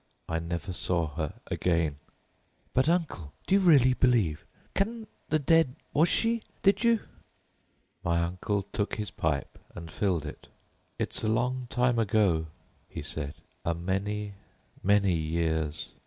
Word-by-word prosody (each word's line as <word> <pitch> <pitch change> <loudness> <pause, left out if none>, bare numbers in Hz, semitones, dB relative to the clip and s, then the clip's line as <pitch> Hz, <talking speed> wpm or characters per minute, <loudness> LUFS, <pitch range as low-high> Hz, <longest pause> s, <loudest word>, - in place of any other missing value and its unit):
"I 80 - -1
never 85 +3 -4
saw 85 -3 0
her 75 0 -3
again——" 85 -5 0 0.7
"But, 130 +5 +3
uncle, 155 - -1
do - - 0
you 200 - +6
really 140 -8 +6
believe?—Can 125 - 0 0.2
the 155 - +3
dead?—was 155 +1 +2
she—did 225 -2 +1
you——" 235 -2 +4 1.0
My 85 0 +2
uncle 90 +4 -1
took 105 - -1
out - - -2
his 105 -1 -4
pipe 75 -3 -2 0.2
and 85 -2 -8
filled 90 -7 0
it. 75 - -9 0.5
"It's - - -2
a - - +1
long 125 +3 0
time 125 -1 +2
ago," 100 -7 +2 0.4
he - - -6
said, 75 -2 -3 0.3
"a 85 - 0
many, 100 +4 -2 0.5
many 100 -1 +4
years. 80 -1 -1
100 Hz, 130 wpm, -29 LUFS, 85-130 Hz, 1.0 s, you